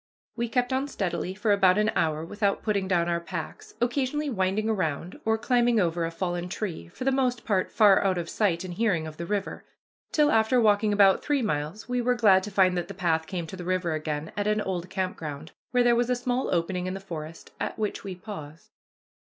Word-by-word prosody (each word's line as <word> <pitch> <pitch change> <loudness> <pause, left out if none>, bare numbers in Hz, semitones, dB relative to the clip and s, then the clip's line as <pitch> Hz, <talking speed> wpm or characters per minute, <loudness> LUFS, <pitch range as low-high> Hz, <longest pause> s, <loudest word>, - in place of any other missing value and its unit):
We 235 0 -2
kept 250 +1 0
on 265 +2 0
steadily 185 -6 -3
for 210 +1 0
about 190 -2 +4
an 215 +1 +2
hour 155 0 0
without 205 +2 -1
putting 200 -3 0
down 175 -2 +2
our 170 0 0
packs, 170 -1 -7
occasionally 270 +4 0
winding 195 +1 0
around 180 -5 -2
or 220 0 +2
climbing 240 0 +2
over 170 -2 +1
a - - -2
fallen 175 +1 -3
tree, 180 - -4
for 170 - -8
the 270 - +2
most 255 -3 0
part 190 -4 +1
far 205 -3 +5
out 190 -2 +1
of 170 -1 -3
sight 185 -5 0
and 180 -1 -6
hearing 180 -5 +1
of 155 -1 -8
the 170 - -5
river; 205 0 -3 0.5
till, 300 -1 +3
after 225 +3 +3
walking 210 -1 +3
about 200 -2 +5
three 285 -3 +1
miles, 160 +1 -3
we 250 0 0
were 250 +1 +2
glad 200 -6 +5
to - - -5
find 190 -2 +3
that 175 - -5
the - - -8
path 165 -3 0
came 180 -4 -3
to 160 - -8
the 180 - -7
river 180 -2 0
again 155 0 -3
at 205 0 -1
an 210 0 +2
old 185 -3 -3
camp 190 -1 -2
ground, 155 0 -7 0.2
where 250 -1 +3
there 240 -1 +4
was 240 +1 +1
a 250 - +3
small 245 +1 -1
opening 180 +1 -1
in 185 - -3
the - - -5
forest, 165 -4 -8
at - - -3
which 215 -2 -3
we 195 -2 -5
paused. 165 -6 -10
195 Hz, 225 wpm, -27 LUFS, 170-225 Hz, 0.5 s, far